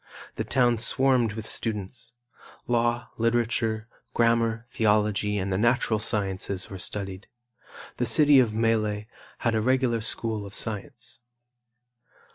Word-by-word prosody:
The - - -2
town 120 -3 +2
swarmed 125 -2 +2
with 110 0 -6
students. 115 +1 -3 0.5
Law, 120 0 0
literature, 115 -1 0 0.3
grammar, 115 0 +2
theology 105 -2 +1
and 95 0 -2
the 95 - 0
natural 120 -1 +2
sciences 100 -3 -2
were 95 - -7
studied. 95 0 -4 0.7
The - - 0
city 145 -3 +6
of 120 -4 +3
Melle 110 -2 0 0.3
had 115 - 0
a 110 - +1
regular 125 -1 +1
school 110 -2 -1
of 100 0 -9
science. 110 +1 -4
115 Hz, 120 wpm, -26 LUFS, 105-120 Hz, 0.7 s, city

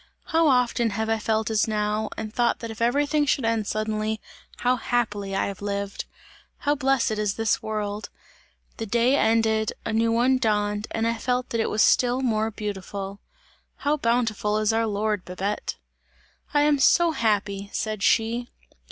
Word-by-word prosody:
How 325 0 +4
often 250 -3 +2
have 220 +2 -2
I 225 0 +1
felt 220 +1 0
as 215 0 +2
now, 215 0 -1
and 215 -1 -5
thought 240 -1 +2
that 230 -1 -6
if 220 - -9
everything 290 +5 +2
should 265 -3 +1
end 225 -2 0
suddenly, 215 0 -1 0.4
how 250 +1 +2
happily 220 -5 -1
have 195 0 -2
I - - -5
lived! 200 0 -3 0.5
How 290 - +1
blessed 270 -6 +1
is 210 -2 0
this 225 -1 +1
world! 210 -1 -3 0.7
The 225 - -4
day 235 +5 +3
ended, 220 -3 +2
a - - -2
new 225 +1 +2
one 250 +3 +3
dawned 210 -2 0
and 225 0 -1
I 230 -1 -1
felt 250 +1 -1
that 230 - +1
it - - 0
was 215 - +3
still 250 +1 +3
more 220 -3 +1
beautiful! 200 -2 -5 0.6
How 290 +1 0
bountiful 230 -5 0
is 215 +1 +2
our 225 0 +1
Lord, 210 -1 -1
Babette!" 190 +3 -3 0.8
"I 290 - +3
am 295 -1 +3
so 340 +4 +5
happy!" 205 -6 0
said 215 -2 -3
she. 230 +4 +1
220 Hz, 170 wpm, -25 LUFS, 210-240 Hz, 0.8 s, so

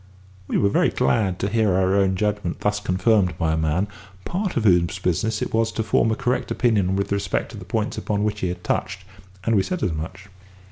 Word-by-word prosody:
We - - 0
were 100 - +3
very - - +3
glad 95 +6 +1
to 100 - -1
hear 110 -3 +2
our 95 0 +2
own 95 -1 +2
judgment 105 -3 -2
thus 105 0 +1
confirmed 95 -2 +2
by 80 -1 +1
a - - +2
man, 80 +5 0 0.4
part 190 -2 -2
of 115 - +1
whose 90 -4 +3
business 95 +5 0
it - - -5
was 115 0 +2
to 110 - -1
form 110 - +2
a 110 - +1
correct 125 -1 -1
opinion 100 -6 +1
with 100 +1 -2
respect 100 -2 -1
to - - -9
the - - -10
points - - -2
upon 105 -1 -1
which 105 -1 -1
he 95 - -1
had 90 0 -5
touched, 95 0 -2 0.4
and 115 +1 +2
we 100 - +4
said 180 - -3
as 85 - +1
much. 90 +5 -6
100 Hz, 225 wpm, -23 LUFS, 90-110 Hz, 0.4 s, we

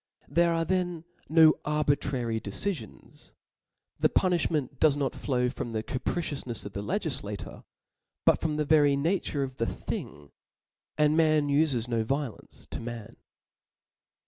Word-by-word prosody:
There 170 0 +3
ate 165 -1 0
then 180 -3 0
Book 170 - -29 0.2
no 160 0 +7
ai^lntrary 140 -6 0
decifions 115 - -5
j - - -25 0.7
the - - +4
puniflwncnt 165 -6 +1
does 150 -2 +4
not 140 -2 0
c^IaS - - -13
flow 125 -3 +1
from 120 -3 -5
the 110 -1 -2
capricioufnefs 130 -2 -3
of 100 - -7
the 100 - -4
Icgiflacor, 130 - -4 0.6
but - - +4
from 155 -2 0
the 150 - 0
very 145 -2 +5
nature 150 -1 0
of 130 -1 -6
the 115 - 0
thing - - -4
^ 75 -1 -17 0.7
and 150 0 +4
man 155 -2 +3
ufes 140 -5 +2
no 115 -2 0
violence 135 -1 -4
to - - -4
man. 115 -1 -7
145 Hz, 150 wpm, -28 LUFS, 120-160 Hz, 0.7 s, no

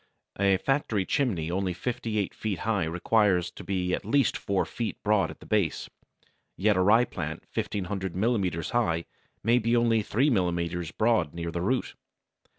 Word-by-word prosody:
A 100 -1 +4
factory 110 -4 0
chimney 90 - 0
only 95 0 -1
fifty 115 +2 -3
eight 100 -3 -1
feet 105 -4 -3
high 105 -6 0
requires 90 +1 +2
to - - -10
be 90 -2 -1
at - - -1
least 130 +5 +2
four 100 -1 0
feet 115 -2 -4
broad 105 -2 +2
at - - -10
the - - -12
base, 100 -7 0 0.7
yet 105 +2 +3
a - - +1
ryeplant 95 -6 +2
1500 95 -2 -3
millimetres 95 -6 0
high 85 -9 +1 0.4
may 120 +2 +4
be 115 +1 +1
only 115 -2 +3
three 130 +8 +1
millimetres 85 -4 0
broad 110 -7 +1
near 85 0 -3
the 85 - -3
root. 125 +8 0
100 Hz, 160 wpm, -27 LUFS, 90-115 Hz, 0.7 s, A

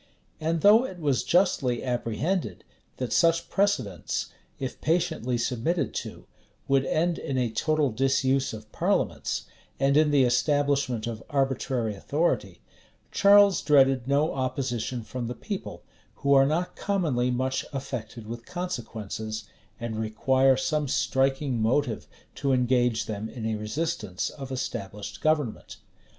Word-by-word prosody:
And 160 +1 -1
though 215 +6 +7
it 190 -8 -6
was 145 -6 0
justly 140 -9 +2
apprehended, 125 - -2 0.3
that 125 -2 -2
such 165 0 +3
precedents, 130 - 0 0.3
if 130 -2 -5
patiently 160 -7 0
submitted 125 +8 -1
to, - - -10 0.4
would 135 -1 +3
end 170 +1 +1
in 135 - -3
a 125 -3 0
total 150 +4 +1
disuse 135 +2 +1
of 110 -1 -10
parliaments, - - 0 0.4
and 135 +1 +3
in 155 0 +5
the 145 -2 +4
establishment 135 -2 +1
of 115 -2 -5
arbitrary 135 -5 0
authority, 150 - -1 0.5
Charles 200 -1 +6
dreaded 135 -4 +4
no 145 +3 +2
opposition 130 -2 -2
from 120 +1 -5
the 120 - -4
people, - - -6 0.3
who 140 +1 +2
are 135 0 +6
not 170 +5 -1
commonly 155 -12 0
much 130 +1 -1
affected 125 -5 -6
with 115 +2 -7
consequences, 110 - -5 0.4
and 115 -2 -4
require 130 +4 +3
some 150 +2 0
striking 135 -1 +1
motive 120 +1 0 0.3
to 135 -1 0
engage 125 -2 +2
them 110 +1 -4
in 115 -4 -6
a 110 - 0
resistance 105 - -3
of 135 -2 -8
established 105 -5 -5
government. 150 -7 0
130 Hz, 130 wpm, -27 LUFS, 120-150 Hz, 0.5 s, though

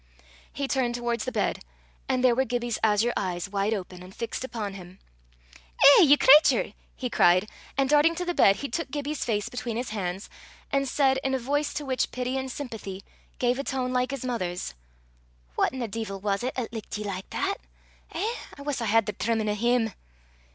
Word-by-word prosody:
He 280 -1 -3
turned 255 -3 0
towards 240 -2 -2
the 255 - -2
bed, - - 0 0.5
and 255 -1 +1
there 250 -2 +6
were 260 +3 +2
Gibbie's 240 -2 -2
azure 220 +2 +3
eyes 180 -1 -2
wide 200 +1 -1
open 185 -4 -4
and 185 +1 -12
fixed 230 +2 -4
upon 220 -6 -4
him. 185 -1 -11 0.8
"Eh, 280 +6 +9
ye 295 -4 +7
cratur!" 295 +4 +6 0.2
he 255 - -3
cried; 180 -3 +4 0.3
and 275 -1 +3
darting 300 +4 +4
to 360 +2 -3
the 350 - -1
bed, 195 - +5
he 280 - -4
took 280 +4 -3
Gibbie's 290 +1 -3
face 210 -4 -1
between 240 -2 -4
his 245 -2 -3
hands, 190 -2 -3 0.4
and 275 0 +1
said, 265 0 +3
in 265 0 +1
a - - +2
voice 285 +4 -1
to 295 - -3
which 260 -2 0
pity 250 +1 -3
and 265 -1 -3
sympathy 220 -8 -6 0.3
gave 250 +1 +1
a - - -1
tone 255 -2 -2
like 250 0 +1
his 275 -2 -4
mother's, 180 - -3 0.8
"Whaten 260 -2 0
a - - -2
deevil 215 -2 -5
was 200 +1 -1
't 255 +2 -1
'at 240 -3 -3
lickit 220 -2 -5
ye 210 - -4
like 195 -2 -5
that? 390 +1 -1 0.5
Eh! 455 +3 -2 0.2
I 280 - -9
wuss 285 -3 -2
I - - -1
had 225 0 +3
the 210 - -3
trimmin' 220 +1 0
o' - - +1
him!" 230 0 +1
240 Hz, 200 wpm, -27 LUFS, 210-265 Hz, 0.8 s, Eh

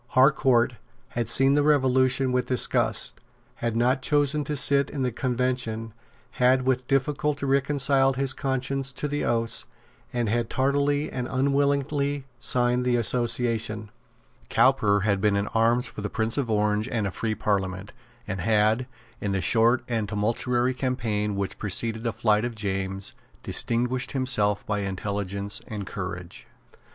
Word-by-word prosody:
Harcourt 130 -3 +4 0.3
had 120 -2 -3
seen 135 +3 +4
the 145 - +3
Revolution 130 -2 +3
with 125 0 0
disgust, 125 - 0 0.4
had 115 -1 -2
not 125 +3 +2
chosen 145 +2 +1
to 150 - -2
sit 140 0 +2
in 140 -3 -3
the 125 - 0
Convention, 120 -2 -2 0.4
had 130 0 +3
with 130 -1 0
difficulty 140 +1 0
reconciled 135 -1 +2
his 135 -1 0
conscience 135 0 -2
to 145 - -3
the 145 0 -2
oaths, 115 -1 0 0.4
and 120 -2 -1
had 115 +1 0
tardily 145 +2 +1
and 125 -1 -3
unwillingly 140 +1 0
signed 125 0 +1
the 125 -1 +2
Association. 115 -2 0 0.6
Cowper 105 -6 +3
had 100 -1 +1
been 105 -1 +2
in 100 0 0
arms 115 +3 +2
for - - -8
the 105 - -3
Prince 110 +1 -1
of 135 -5 -1
Orange 105 +1 +1
and 110 -5 -1
a 100 - -2
free 110 +3 -2
Parliament, 95 -1 -2 0.3
and 95 -3 -3
had, 110 +3 +2 0.3
in 100 -1 -2
the 95 - 0
short 115 +8 +3
and 110 -4 -2
tumultuary 120 +4 0
campaign 115 -6 -1
which 100 -1 -3
preceded 110 +3 -2
the 115 - 0
flight 110 -1 +1
of 120 -1 -3
James, 95 -2 -3 0.3
distinguished 125 +2 -1
himself 105 -7 +1
by 105 -1 -1
intelligence 100 0 -3
and 105 -2 -5
courage. 90 -3 -7
120 Hz, 145 wpm, -25 LUFS, 105-130 Hz, 0.6 s, Harcourt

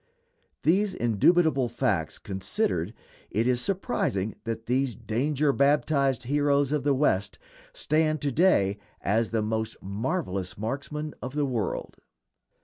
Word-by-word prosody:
These 190 +4 +2
indubitable 135 - +3
facts 95 -8 -1
considered, 95 - -2 0.3
is 110 +3 0
it 125 - +3
surprising 115 - -1
that 115 0 -4
these 130 -1 0
danger 140 +7 0
baptized 140 -2 +2
heroes 145 +1 +2
of 150 -2 0
the 140 -1 +2
West 105 -8 +1 0.3
stand 155 0 +1
to 145 -2 0
day 110 - +3 0.2
as 110 +3 +1
the 110 -2 0
most 110 0 -2
marvelous 100 - -3
marksmen 140 +7 -4
of 130 +2 -6
the 145 -1 +1
world? 120 -6 -3
130 Hz, 125 wpm, -27 LUFS, 110-150 Hz, 0.3 s, indubitable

